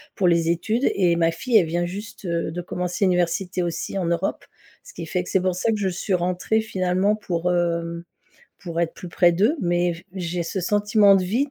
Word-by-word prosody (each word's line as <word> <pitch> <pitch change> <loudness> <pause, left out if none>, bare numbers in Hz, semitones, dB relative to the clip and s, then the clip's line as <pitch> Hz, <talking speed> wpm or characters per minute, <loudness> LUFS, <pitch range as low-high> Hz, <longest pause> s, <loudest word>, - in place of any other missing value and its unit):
pour 185 - +2
les 170 -1 +3
études 215 +10 +1
et 175 -3 +3
ma 165 0 +2
fille, 235 +8 -2
elle 170 -5 +3
vient 175 +2 -1
juste, 205 +3 -8
heu, 170 -2 -1
de 175 +1 -4
commencer 180 +2 -2
l'université 180 0 0
aussi 170 +3 -3
en 185 - -1
Europe. 170 +3 -1 0.4
Ce - - -14
qui - - -6
fait 180 -1 -1
que - - -9
c'est 190 - +2
pour 185 -1 0
ça 225 +5 0
que 215 - 0
je 190 -2 0
suis 185 +2 -3
rentrée 180 +5 0
finalement 190 0 0
pour, 180 -4 -2
hem, 170 -1 -1 0.6
pour 170 -2 -4
être 165 -1 -1
plus 180 - -9
près 175 0 +4
d'eux. 215 - +2
Mais, 175 0 +1
j 170 - -13
j'ai 175 -1 -3
ce 190 - -4
sentiment 205 +1 +4
de 185 - +1
vide, 255 +9 0
180 Hz, 220 wpm, -23 LUFS, 170-200 Hz, 0.6 s, près